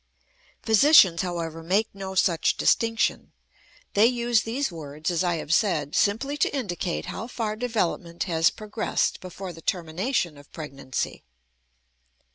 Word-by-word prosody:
Physicians, 220 Hz, -, +6 dB
however, 165 Hz, -3 st, -4 dB
make 195 Hz, +6 st, +1 dB
no 190 Hz, -1 st, -6 dB
such 170 Hz, -3 st, +2 dB
distinction. 230 Hz, 0 st, +1 dB, 0.6 s
They 210 Hz, +3 st, +6 dB
use 240 Hz, -2 st, +2 dB
these 245 Hz, +3 st, -2 dB
words, 155 Hz, 0 st, -5 dB
as 175 Hz, +1 st, 0 dB
I 175 Hz, -1 st, +1 dB
have 160 Hz, -1 st, -2 dB
said, 165 Hz, -8 st, +1 dB
simply 250 Hz, +8 st, +1 dB
to -, -, +2 dB
indicate 175 Hz, -, -3 dB
how 225 Hz, -, -5 dB
far 225 Hz, -3 st, -3 dB
development 205 Hz, -7 st, -2 dB
has 165 Hz, -3 st, +3 dB
progressed 215 Hz, 0 st, -2 dB
before 185 Hz, 0 st, -7 dB
the 165 Hz, -, -12 dB
termination 175 Hz, -, -1 dB
of 145 Hz, -, -18 dB
pregnancy. 135 Hz, -4 st, -5 dB
185 Hz, 130 wpm, -25 LUFS, 165-225 Hz, 0.6 s, Physicians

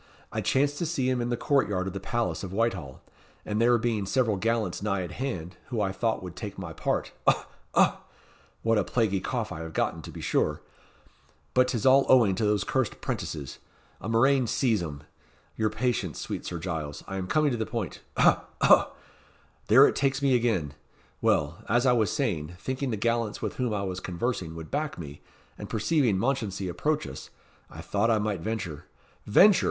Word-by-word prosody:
I -, -, -2 dB
chanced 145 Hz, +2 st, +1 dB
to 170 Hz, -, 0 dB
see 140 Hz, -6 st, 0 dB
him 130 Hz, -1 st, +1 dB
in 120 Hz, -, -2 dB
the 120 Hz, -, 0 dB
court 140 Hz, -2 st, +2 dB
yard 95 Hz, -2 st, -1 dB
of 95 Hz, -, -4 dB
the 100 Hz, -, -4 dB
palace 115 Hz, +4 st, -2 dB
of 95 Hz, -, -5 dB
Whitehall, 95 Hz, -, -2 dB, 0.4 s
and 105 Hz, +1 st, -1 dB
there 120 Hz, +1 st, +5 dB
being 110 Hz, -4 st, -1 dB
several 115 Hz, -2 st, +2 dB
gallants 110 Hz, -2 st, -1 dB
nigh 100 Hz, -2 st, 0 dB
at 90 Hz, -, -6 dB
hand, 90 Hz, -7 st, -4 dB
who 120 Hz, -4 st, -3 dB
I 100 Hz, -2 st, +1 dB
thought 110 Hz, +1 st, -1 dB
would 90 Hz, -2 st, -7 dB
take 100 Hz, 0 st, -6 dB
my 90 Hz, -4 st, -6 dB
part -, -, -1 dB, 0.2 s
ough! -, -, +3 dB, 0.3 s
ough! -, -, +4 dB, 0.7 s
what 115 Hz, -1 st, +3 dB
a -, -, +2 dB
plaguey 105 Hz, -2 st, +1 dB
cough 115 Hz, -1 st, -2 dB
I -, -, -5 dB
have 80 Hz, 0 st, -7 dB
gotten, -, -, -1 dB
to -, -, -9 dB
be -, -, -9 dB
sure; -, -, 0 dB, 0.9 s
but 125 Hz, 0 st, +4 dB
't 125 Hz, -, -2 dB
is 110 Hz, -, -4 dB
all 135 Hz, +1 st, +6 dB
owing 115 Hz, -7 st, +6 dB
to 100 Hz, -, -2 dB
those 105 Hz, -1 st, +2 dB
cursed 130 Hz, -4 st, -1 dB
'prentices 70 Hz, -5 st, -4 dB, 0.4 s
a 105 Hz, -, -4 dB
murrain 130 Hz, +2 st, +3 dB
seize 115 Hz, -4 st, +1 dB
'em! 75 Hz, -4 st, -6 dB, 0.5 s
Your 110 Hz, -1 st, +1 dB
patience, 115 Hz, -, -1 dB
sweet -, -, -5 dB
Sir 85 Hz, -, -4 dB
Giles, 80 Hz, -4 st, -4 dB
I 95 Hz, -, -4 dB
am 95 Hz, -1 st, -3 dB
coming 150 Hz, +5 st, +2 dB
to -, -, 0 dB
the 110 Hz, -, -2 dB
point 110 Hz, -4 st, -4 dB, 0.2 s
ough! -, -, +4 dB, 0.2 s
ough! -, -, +5 dB, 0.7 s
there 130 Hz, +6 st, +8 dB
it -, -, -1 dB
takes 135 Hz, -1 st, +1 dB
me 140 Hz, -2 st, +2 dB
again. 110 Hz, -, +1 dB, 0.5 s
Well, 75 Hz, +3 st, +1 dB
as 120 Hz, +4 st, +3 dB
I 125 Hz, -, +5 dB
was 110 Hz, -3 st, +2 dB
saying, 90 Hz, -, -2 dB
thinking 130 Hz, +6 st, -3 dB
the 110 Hz, -, -1 dB
gallants 115 Hz, 0 st, 0 dB
with -, -, -4 dB
whom 125 Hz, -3 st, 0 dB
I 105 Hz, -2 st, -1 dB
was 95 Hz, -1 st, -3 dB
conversing 90 Hz, -2 st, -3 dB
would 80 Hz, -1 st, -8 dB
back 150 Hz, +1 st, -2 dB
me, 75 Hz, -4 st, -8 dB, 0.4 s
and -, -, -7 dB
perceiving 115 Hz, -, +2 dB
Mounchensey 110 Hz, -5 st, -1 dB
approach 150 Hz, -, -1 dB
us, 65 Hz, -1 st, -8 dB, 0.4 s
I -, -, -9 dB
thought 100 Hz, +3 st, 0 dB
I 115 Hz, -, +4 dB
might 105 Hz, -4 st, -1 dB
venture" 85 Hz, -7 st, -4 dB, 0.4 s
"Venture!" 190 Hz, -, +7 dB
110 Hz, 200 wpm, -27 LUFS, 95-125 Hz, 0.9 s, there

